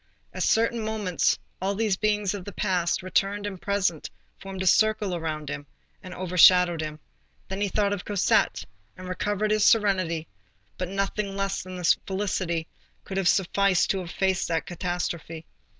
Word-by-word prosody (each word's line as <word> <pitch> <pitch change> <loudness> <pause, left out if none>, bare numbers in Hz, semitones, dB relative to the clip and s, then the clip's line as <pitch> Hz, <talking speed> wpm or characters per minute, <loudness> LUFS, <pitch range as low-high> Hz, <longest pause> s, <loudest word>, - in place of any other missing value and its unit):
At - - -5
certain 230 +1 +2
moments, 215 -5 0 0.2
all 195 +1 0
these 215 -2 +1
beings 210 -1 0
of 200 -3 -6
the 205 - -7
past, 180 -4 0
returned 195 +2 0
and 190 -3 -6
present, 200 -6 -1 0.3
formed 190 -1 -6
a - - -3
circle 215 0 +3
around 155 -3 -4
him, 145 0 -5 0.3
and 185 - -10
overshadowed 180 -1 +5
him; 155 0 -5 0.5
then 190 +1 -4
he 205 - +2
thought 200 +1 +1
of 200 - -4
Cosette, 205 -2 +1 0.3
and 185 0 -9
recovered 205 +3 -1
his 215 -1 +3
serenity; 185 -8 +2 0.5
but 180 -1 -4
nothing 195 +1 -2
less 195 0 -1
than 185 0 -8
this 180 -2 +3
felicity 185 -4 -1 0.4
could 195 - -6
have 195 -2 +1
sufficed 195 0 +3
to 195 - -1
efface 185 +1 -1
that 165 -1 -1
catastrophe. 175 -2 -4
190 Hz, 160 wpm, -26 LUFS, 175-205 Hz, 0.5 s, overshadowed